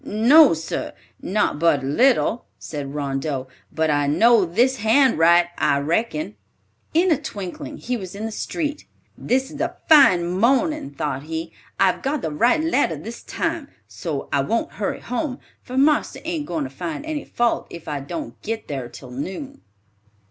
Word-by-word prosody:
"No, 250 - +6
sir, 160 +1 -4 0.3
not 200 -5 0
but 150 -4 +3
a - - -3
little," 240 - +2
said 145 -2 -6
Rondeau; 135 -1 -2 0.2
"but 160 -1 +1
I 145 -1 +1
know 215 +8 +5
this 240 +10 +2
hand 230 - +3
write, 170 +1 +5
I 145 -2 +3
reckon." 155 - -1 0.6
In 350 +2 +4
a 305 - +2
twinkling, 190 -4 -6
he 250 0 -3
was 190 -3 -8
in 210 +2 -5
the 225 - -4
street. 295 +6 -4 0.3
"This 265 +3 -1
is 300 - -7
a 335 - -2
fine 275 - +7
morning," 250 - +1
thought 140 -1 -3
he. 160 +1 -5 0.3
"I've 190 -1 +3
got 280 +1 -2
the 160 - -2
right 240 - +2
letter 285 - +1
this 220 +11 -8
time, - - -3 0.2
so - - -5
I - - +3
won't - - -1
hurry - - -3
home, 255 +1 -3 0.2
for 255 +1 -7
marster 295 +2 +2
ain't 320 -3 -3
goin' 165 -4 -2
to 130 - -6
find 165 - -5
any 310 -2 -3
fault 240 0 0
if 170 - -10
I 145 -2 -2
don't 295 - -7
git 225 +1 -4
thar 135 -4 -4
till 125 +1 -12
noon." 190 - -6
200 Hz, 170 wpm, -22 LUFS, -, 0.6 s, fine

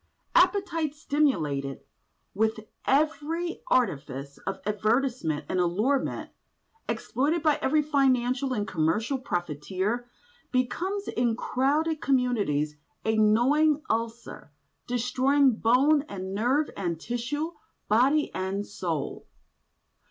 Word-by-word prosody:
Appetite, 360 - +2
stimulated 160 - 0 0.5
with 220 +2 0 0.2
every 315 +4 0
artifice 140 - -1
of 195 - -2
advertisement 215 - 0
and 185 - -1
allurement, 210 +11 0 0.6
exploited 295 +7 0
by 305 -2 +3
every 300 +2 +2
financial 265 -3 +2
and 210 -5 -1
commercial 190 - 0
profiteer, 190 - -2 0.4
becomes 355 +11 -1
in 235 -1 0
crowded 295 +6 0
communities 205 - +1 0.3
a 220 0 +2
gnawing 275 +8 +3
ulcer, 230 -7 -4 0.4
destroying 255 +1 +2
bone 270 +7 +4
and 190 -1 -5
nerve 255 +9 +1
and 170 -4 -2
tissue, 245 - -3 0.4
body 265 +8 +3
and 195 +2 -2
soul. 170 -8 -4
245 Hz, 95 wpm, -27 LUFS, 200-290 Hz, 0.6 s, bone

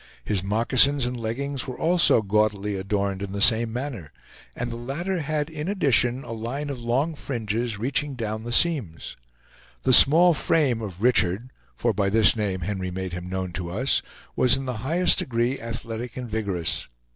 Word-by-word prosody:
His 100 -3 0
moccasins 120 +7 +2
and 125 +1 -3
leggings 125 +4 -3
were 130 - -6
also 170 -9 +3
gaudily 105 0 0
adorned 100 0 -2
in 100 -1 -5
the 100 - -3
same 110 +1 +4
manner; 120 - -6 0.4
and 120 0 -4
the - - -5
latter 160 +10 -3
had 150 -1 -2
in 155 0 -6
addition 135 - +1
a - - -9
line 125 +6 -4
of 135 - -6
long 125 +7 0
fringes, 115 -5 -3
reaching 135 +5 -2
down 110 -2 -4
the 120 - -6
seams. 125 - 0 0.7
The 130 - +3
small 170 +8 +8
frame 135 -6 +1
of 100 -2 -7
Richard, 120 -1 +2 0.2
for 120 -2 0
by 100 0 0
this 110 +3 +5
name 100 -4 -2
Henry 95 +1 -3
made 95 0 -5
him 90 0 -6
known 95 -1 -3
to 85 0 -5
us, 120 +10 0 0.3
was 125 0 +4
in 135 - -5
the 125 -3 -4
highest 165 +8 +2
degree 120 +1 -1
athletic 115 +1 -6
and 125 -1 -5
vigorous. 100 -7 -3
115 Hz, 175 wpm, -24 LUFS, 105-135 Hz, 0.7 s, small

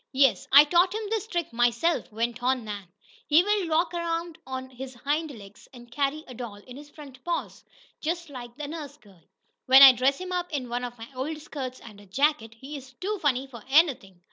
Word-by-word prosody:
"Yes, 270 -1 +3
I 285 +2 +10
taught 355 +5 +3
him 440 - -3
this 440 -1 -1
trick 345 - -3
myself," 240 +9 +1
went 235 +2 -2
on 255 0 +1
Nan. 205 -3 -6 0.4
"He 310 +4 +5
will 410 -3 0
walk 330 +2 +1
around 335 -1 -3
on 260 0 -6
his 260 0 -9
hind 300 +6 -1
legs, 205 -6 -13
and 240 -2 -14
carry 285 +4 -1
a 255 - -9
doll 235 -3 -7
in 245 +5 -13
his 290 +1 -12
front 275 -4 -13
paws, 345 -1 -4 0.4
just 335 0 -3
like 245 -3 -8
a 295 -1 -5
nurse 300 -2 -7
girl. 195 -5 -21 0.5
When 265 +1 +9
I 270 - +12
dress 260 +2 +1
him 370 0 -6
up 355 -1 -2
in 265 -5 -3
one 245 +1 -3
of 245 0 -6
my 225 0 -10
old 275 +5 -4
skirts 270 -4 -6
and 210 -3 -13
a 205 - -17
jacket, 245 0 0
he 270 +6 -9
is 265 -1 -10
too 400 +9 -4
funny 270 -3 +1
for 240 -5 -12
anything! 270 - +2
270 Hz, 215 wpm, -26 LUFS, 240-320 Hz, 0.5 s, I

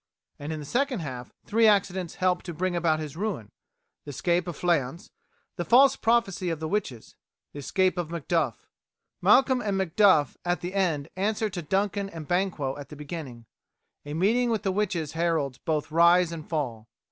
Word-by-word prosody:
And 145 +2 -5
in 155 - -4
the 150 - -7
second 255 - 0
half 125 -5 -7
three 225 +1 +3
accidents 190 -4 +1
help 180 -1 +1
to 175 -3 -6
bring 180 +2 -1
about 165 -2 +2
his 150 -2 -6
ruin: 175 - -4 0.5
the - - -10
escape 175 +5 0
of 175 - -5
Fleance, 170 0 -1 0.5
the 175 - -1
false 265 +7 +6
prophecy 225 -6 +1
of 165 -2 -3
the 160 - -3
witches, 155 - -4 0.4
the 145 - -7
escape 185 +5 +1
of 170 -3 -3
Macduff. 165 -6 -2 0.5
Malcolm 255 +6 +4
and 200 -2 -1
Macduff 190 -5 +3
at 175 0 -1
the 180 +2 -5
end 170 -8 0
answer 210 +2 -1
to 175 - -4
Duncan 195 +4 -1
and 160 -5 -9
Banquo 175 -7 -1
at 145 - -9
the 150 - -9
beginning. 145 -6 -8 0.6
A 145 +1 -6
meeting 230 +8 +2
with 220 -2 -1
the 195 - +1
witches 185 -6 -1
heralds 160 -5 -1
both 155 -1 -2
rise 170 +1 +5
and 160 -2 -8
fall. 120 -9 -3
175 Hz, 180 wpm, -26 LUFS, 150-195 Hz, 0.6 s, false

